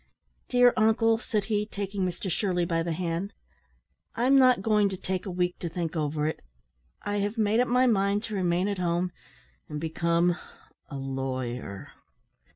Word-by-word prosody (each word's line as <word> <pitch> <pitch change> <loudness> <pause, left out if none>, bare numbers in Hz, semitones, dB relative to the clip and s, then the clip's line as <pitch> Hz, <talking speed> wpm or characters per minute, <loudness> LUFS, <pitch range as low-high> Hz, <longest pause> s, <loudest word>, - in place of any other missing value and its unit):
"Dear 245 -1 +5
uncle," 225 +1 +3
said 215 -3 -1
he, 210 0 -1
taking 200 -2 -3
Mr 180 +2 -3
Shirley 180 -1 0
by 165 -1 0
the 170 +1 -2
hand, 175 +4 -3 0.8
"I'm 255 +4 +3
not 255 -6 +5
going 210 -2 +3
to 190 - -5
take 185 +1 -3
a - - -3
week 180 0 -1
to 170 - -3
think 165 0 -3
over 150 -1 -1
it. 155 - -2 0.6
I 205 0 -1
have 205 +3 -1
made 215 +1 +2
up 250 - +3
my 250 +2 +3
mind 200 -3 +2
to 220 - -5
remain 180 -1 +1
at 200 -2 -2
home, 175 0 0 0.6
and 150 -1 -4
become 170 +2 +1 0.5
a 140 - -6
lawyer." 130 -6 -4
185 Hz, 165 wpm, -27 LUFS, 170-210 Hz, 0.8 s, Dear